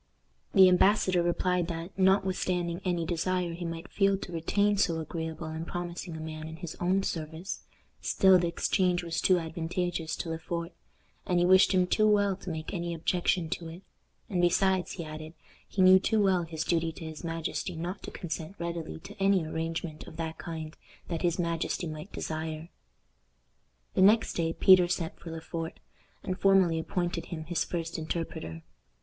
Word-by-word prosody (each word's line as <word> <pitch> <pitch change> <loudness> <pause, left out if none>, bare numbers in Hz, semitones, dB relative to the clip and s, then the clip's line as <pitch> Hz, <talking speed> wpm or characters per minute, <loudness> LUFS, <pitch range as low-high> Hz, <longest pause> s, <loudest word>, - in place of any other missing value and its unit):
The 190 -1 +9
embassador 185 0 +4
replied 175 0 +1
that, 170 +1 -5
notwithstanding 185 -2 +1
any 175 -3 0
desire 175 +1 -1
he 175 +1 -5
might 165 +1 -5
feel 195 -1 +3
to 190 - -8
retain 200 +5 +1
so 165 -4 +2
agreeable 160 0 -5
and 160 +1 -5
promising 175 -1 -5
a - - -7
man 155 0 -6
in 160 - -7
his 165 -1 -7
own 185 +2 +2
service, 160 +1 -4 0.4
still 190 -1 +5
the 175 - +1
exchange 180 +1 +1
was 165 -1 -2
too 185 - +5
advantageous 165 0 -2
to 170 - -5
Le 160 - -3
Fort, 170 +1 -4 0.6
and 180 - +2
he 175 - +4
wished 185 +1 +6
him 185 -2 +4
too 215 +4 +3
well 205 -2 +3
to 195 - -8
make 160 +1 -5
any 170 -2 -2
objection 175 +1 +1
to 165 - -3
it; 170 +4 -10 0.4
and 180 -3 0
besides, 185 +1 +2
he 170 - -5
added, 155 +1 -8 0.3
he 190 - +1
knew 185 0 +8
too 220 +3 +1
well 190 -4 +3
his 160 -1 -4
duty 165 -1 +1
to 165 - -9
his 160 +1 -8
majesty 165 +2 -3
not 175 +4 -4
to - - -7
consent 170 +1 -5
readily 170 - -4
to - - -10
any 195 -3 +3
arrangement 160 0 -4
of - - -11
that 160 -1 -4
kind 160 -1 -6 0.3
that 165 -2 -2
his 175 -1 +1
majesty 170 +1 -1
might 155 +3 -7
desire. 160 +1 -4 1.2
The - - +2
next 215 +4 +5
day 165 -1 0
Peter 185 -1 +6
sent 175 -2 -3
for 170 - -9
Le 165 0 -6
Fort, 165 0 -5 0.4
and 185 -2 -3
formally 190 -4 +4
appointed 175 0 -2
him 160 -3 -5
his 165 +1 -1
first 165 -1 -4
interpreter. 155 - -4
170 Hz, 180 wpm, -29 LUFS, 160-185 Hz, 1.2 s, The